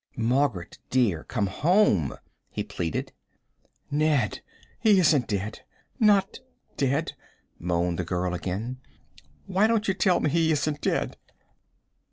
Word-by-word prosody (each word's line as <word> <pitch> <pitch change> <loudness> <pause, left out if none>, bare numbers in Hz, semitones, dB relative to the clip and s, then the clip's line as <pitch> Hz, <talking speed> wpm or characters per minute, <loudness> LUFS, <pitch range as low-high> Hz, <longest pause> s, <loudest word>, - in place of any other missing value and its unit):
"Margaret, 120 -5 0
dear, 110 -11 +1
come 105 - -1
home," 110 - +2 0.3
he - - -3
pleaded. 80 -3 -3 0.8
"Ned, 145 - +1 0.4
he 210 -3 +5
isn't 150 -8 +3
dead 105 0 -3 0.4
not 205 -2 +3 0.4
dead," 140 +3 0 0.5
moaned 85 0 -1
the - - 0
girl 90 +1 -2
again. 100 +8 -4 0.7
"Why 200 +4 +2
don't 225 -1 +1
you 195 - +2
tell 185 -2 +2
me 150 - 0
he 165 -1 +2
isn't 150 -1 -1
dead?" - - -1
130 Hz, 120 wpm, -26 LUFS, -, 0.8 s, he